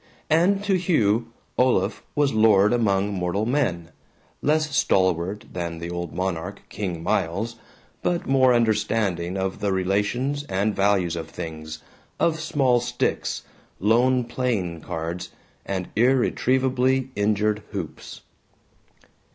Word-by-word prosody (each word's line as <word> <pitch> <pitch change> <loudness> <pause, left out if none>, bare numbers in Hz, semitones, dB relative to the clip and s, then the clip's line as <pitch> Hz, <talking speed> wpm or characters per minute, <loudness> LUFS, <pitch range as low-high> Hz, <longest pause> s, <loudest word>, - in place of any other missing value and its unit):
And 190 +5 +3
to 195 -2 +2
Hugh, 115 - +2 0.3
Olaf 110 -6 +2
was 145 -2 +2
lord 110 -1 +5
among 100 -4 +1
mortal 95 +3 -1
men, 100 - -1 0.5
less 150 -1 +1
stalwart 95 +2 +1
than 85 -2 -4
the 85 +1 -6
old 85 -1 -4
monarch, 95 +1 -3
King 90 -5 -4
Miles, 105 +9 -1 0.4
but 175 -1 0
more 130 -1 +4
understanding 105 -6 +1
of 95 0 -2
the 100 - 0
relations 105 +10 0
and 100 -1 0
values 95 -4 +2
of 80 -1 -5
things, 80 -2 -7 0.4
of 165 -1 +2
small 140 -6 +2
sticks, 120 +1 -2 0.4
lone 120 +5 +3
playing 115 -9 -2
cards, 85 +2 -4 0.4
and 95 -2 -2
irretrievably 130 +2 +2
injured 105 +1 +1
hoops. 95 -7 -7
105 Hz, 115 wpm, -24 LUFS, 90-125 Hz, 0.5 s, lord